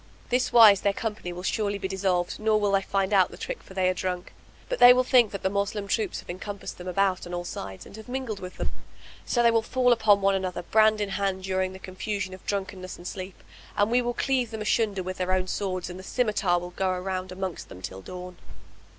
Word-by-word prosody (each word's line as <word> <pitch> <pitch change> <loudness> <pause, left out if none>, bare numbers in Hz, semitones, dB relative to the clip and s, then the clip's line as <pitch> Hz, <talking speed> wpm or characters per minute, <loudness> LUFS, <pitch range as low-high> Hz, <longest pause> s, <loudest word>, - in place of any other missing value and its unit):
This 250 +1 +1
wise 215 -5 +8
their 200 - +2
company 210 -5 -4
will 175 +1 -7
surely 205 +1 0
be 190 - -3
dissolved 185 -2 -1
nor 215 0 +3
will 205 -1 +1
they 195 0 +3
find 195 +1 -1
out 190 -2 +5
the - - -11
trick - - -5
for 190 - -14
they 185 -1 +2
are 185 - +3
drunk, 180 0 -4 0.3
but - - -3
they 245 0 +10
will 255 +1 +3
think 250 -3 +5
that 200 - -6
the - - +3
Moslem 200 0 -1
troops 210 -1 -1
have - - -22
encompassed 200 +2 -7
them 180 - -8
about 185 0 +1
on 175 - -4
all 175 0 -4
sides 95 - -7
and - - -12
have 220 +2 -11
mingled 250 -5 -3
with 180 0 -8
them; - - -3 0.6
so 240 - +2
they 235 - +6
will 225 0 +3
fall 245 +1 +3
on 205 -1 +7
one 195 0 +3
another 185 -2 -2
brand 215 +2 +4
in 205 - -1
hand 195 -1 -1
during 190 0 -1
the - - -8
confusion 190 0 -4
of 185 - -11
drunkenness 190 -2 -4
and 175 - -13
sleep, 185 0 -7 0.3
and 205 +2 +3
we 245 +1 +4
will 240 0 -2
cleave 260 -3 +1
them 220 -1 -5
asunder 210 -3 +1
with 185 +1 -5
their 185 0 -1
own 185 0 +2
swords 185 -2 -2
and 180 +1 -8
the - - -9
scymitar 210 -5 +1
will 175 0 -7
go 190 +1 0
round 185 0 -3
amongst 185 -1 -5
them 90 - -10
till 95 +1 -7
dawn." 180 - -8
195 Hz, 240 wpm, -26 LUFS, 185-215 Hz, 0.6 s, they